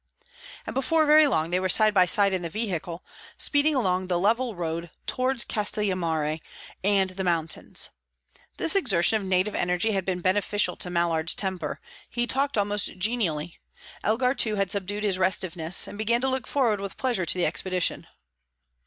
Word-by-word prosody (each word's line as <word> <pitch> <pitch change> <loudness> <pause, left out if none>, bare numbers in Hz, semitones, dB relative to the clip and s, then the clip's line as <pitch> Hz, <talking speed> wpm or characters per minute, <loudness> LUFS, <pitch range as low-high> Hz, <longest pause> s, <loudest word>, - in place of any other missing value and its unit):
And - - -5
before 310 +4 +2
very 305 0 +6
long 165 - 0
they 180 - +3
were 185 0 -1
side 215 +3 +4
by 185 -3 +4
side 200 +1 +4
in 185 - -1
the 170 - -4
vehicle, 180 -4 -4 0.3
speeding 290 +1 +2
along 185 -6 0
the 180 -1 0
level 225 +5 +1
road 170 0 -4 0.2
towards 255 -1 0
Castellammare 175 -7 -1 0.4
and 195 -1 +2
the 190 +1 -5
mountains. 165 -3 -1 0.7
This 330 - +1
exertion 220 - +2
of 195 - -6
native 185 +3 +1
energy 180 +5 0
had 195 -2 -1
been 180 0 -2
beneficial 190 +1 +1
to 180 - -1
Mallard's 170 -2 +1
temper; 190 -2 -3 0.3
he 240 0 -1
talked 275 +1 -1
almost 205 -1 0
genially. 180 -6 -2 0.4
Elgar, 250 +4 +1
too, 220 -5 0
had 195 -2 -1
subdued 205 +1 -2
his 195 -3 +1
restiveness, 180 -2 +2
and 205 - -9
began 235 +2 +1
to 265 - 0
look 260 -1 -3
forward 235 -7 +1
with 200 -1 -6
pleasure 240 -10 -1
to - - +1
the 180 - +1
expedition. 185 -2 -1
195 Hz, 170 wpm, -25 LUFS, 180-225 Hz, 0.7 s, very